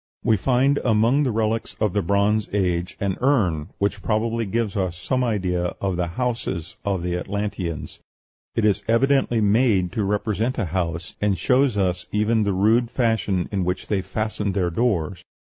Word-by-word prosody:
We 110 - +4
find 135 +6 +2
among 115 +4 +3
the 135 -4 +1
relics 110 0 -1
of 105 -4 +1
the 100 - +1
Bronze 100 +3 +1
Age 90 -3 0
an 100 -2 -1
urn, 95 - +1
which 100 +1 -1
probably 115 +1 0
gives 110 0 -1
us 95 -3 -1
some 130 +7 -1
idea 90 -6 -1
of 95 -2 -1
the 85 0 -1
houses 95 -4 -3
of 95 -4 -1
the 90 0 -1
Atlanteans: 95 -3 -4 0.6
it 115 - +1
is 105 -1 +2
evidently 120 0 +2
made 105 -4 +3
to 110 - -1
represent 105 +4 -1
a 110 - 0
house, 85 -1 -3
and 105 -2 +1
shows 130 -3 +2
us 90 -2 0
even 110 +2 +2
the 100 -1 +1
rude 110 +5 +3
fashion 110 -7 0
in 100 -2 0
which 90 +1 -3
they 100 -2 +1
fastened 105 -1 -3
their 90 -3 +1
doors. 95 -4 0
105 Hz, 170 wpm, -23 LUFS, 90-115 Hz, 0.6 s, We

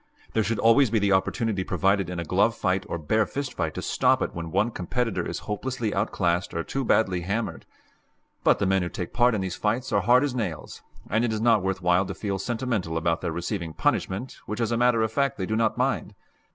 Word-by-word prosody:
There 110 - +2
should 110 +1 -1
always 115 +3 +5
be 110 - +1
the 100 -1 +2
opportunity 100 +1 +1
provided 95 -1 +1
in 90 -1 -4
a - - -2
glove 100 +7 +2
fight 95 -1 -1
or - - -2
bare 105 +7 +1
fist 140 -1 -4
fight 80 -4 -2
to - - -4
stop - - +2
it - - -4
when 85 -1 -5
one 100 +7 +1
competitor 115 +5 -2
is - - -4
hopelessly 115 +1 -3
outclassed 90 -3 0
or 85 - -1
too 135 +8 -3
badly 95 -7 +2
hammered. 100 +6 -3 0.8
But - - +4
the - - 0
men 95 0 +2
who 90 - -2
take 90 - -6
part 120 +1 +3
in 100 - -1
these 95 -1 -3
fights 115 +5 -1
are 100 - +3
hard 120 +6 +5
as 145 -3 -1
nails, 100 -11 -4 0.3
and 110 +3 +1
it 120 - +1
is 110 - -1
not 115 -2 +4
worth 95 0 -2
while 90 +2 +3
to 95 - -5
feel 100 -2 -3
sentimental 110 -7 -2
about 80 0 0
their - - -2
receiving 85 0 -4
punishment 100 +11 -1
which 105 +2 -4
as 115 -1 0
a - - +2
matter 120 -1 +3
of 110 - -1
fact 140 +1 0
they 95 - -2
do 110 - -1
not 110 0 +1
mind. 125 -4 -1
105 Hz, 230 wpm, -26 LUFS, 90-115 Hz, 0.8 s, always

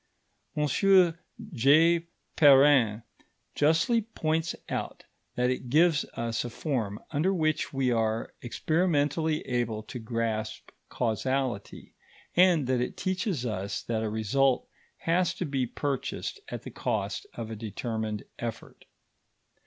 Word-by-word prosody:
M.J. 165 - +3 0.3
Perrin 135 -7 +6 0.5
justly 165 - +3
points 165 -6 -2
out - - -4 0.3
that 125 +1 +2
it 125 -1 -4
gives 155 +2 +4
us 115 -1 -2
a 120 - -4
form 115 -6 -3
under 155 +6 +1
which 155 -5 0
we 135 -2 +1
are 110 -1 0
experimentally 155 +2 0
able 115 -3 -2
to 125 - -7
grasp 110 -1 -3 0.2
causality, 125 -1 -2 0.4
and 175 -5 +5
that 125 -1 +1
it 125 - -3
teaches 185 - -1
us 100 -3 -3
that 115 -2 -2
a 110 - -1
result 125 +5 +1 0.3
has 175 +1 +1
to 185 - -3
be 135 -4 -1
purchased 140 +1 -3
at - - -6
the - - -8
cost - - -2
of 115 -1 -6
a - - -4
determined 110 0 -4 0.2
effort. 115 -2 -7
135 Hz, 120 wpm, -28 LUFS, 115-160 Hz, 0.5 s, Perrin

